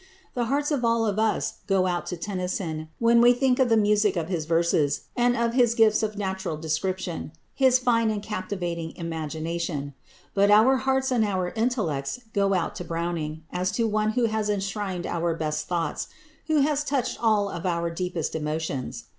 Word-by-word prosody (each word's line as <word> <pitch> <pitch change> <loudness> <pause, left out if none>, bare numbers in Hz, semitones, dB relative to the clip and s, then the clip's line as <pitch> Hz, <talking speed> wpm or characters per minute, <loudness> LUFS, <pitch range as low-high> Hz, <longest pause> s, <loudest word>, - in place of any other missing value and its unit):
The 240 -1 -1
hearts 285 +5 0
of 280 -4 0
all 230 -1 +2
of 210 -1 0
us 220 -1 0
go 195 -2 +3
out 175 -1 -1
to 180 - -4
Tennyson 180 -4 -3
when 235 0 +4
we 240 +1 +7
think 250 0 +1
of 260 -2 +4
the 225 - +4
music 210 -1 +3
of 165 0 -2
his 170 -5 -2
verses, 165 -3 +1
of 240 -1 +2
his 240 -2 +3
gifts 220 -2 +4
of 215 -1 -2
natural 190 -5 -3
description, 165 +1 -3 0.2
his 260 -2 +4
fine 235 -3 +2
and 210 -2 -2
captivating 175 -6 -4
imagination; 160 -2 -4 0.4
but 200 0 +3
our 220 +6 +6
hearts 265 0 0
and 240 -3 +3
our 185 -4 0
intellects 215 - -1
go 200 -1 +2
out 180 - -1
to - - -5
Browning, 165 -2 -3
as 180 +1 0
to 230 +1 +1
one 215 0 +1
who 245 0 +2
has 220 -1 -1
enshrined 195 -3 -2
our 170 -1 -1
best 150 -1 -2
thoughts, 170 -4 -2 0.4
who 310 -2 +3
has 295 +1 +1
touched 280 -3 -1
all 210 -3 +3
our 170 -1 -2
deepest 175 -2 -3
emotions. 150 -4 -3
195 Hz, 175 wpm, -26 LUFS, 170-230 Hz, 0.4 s, we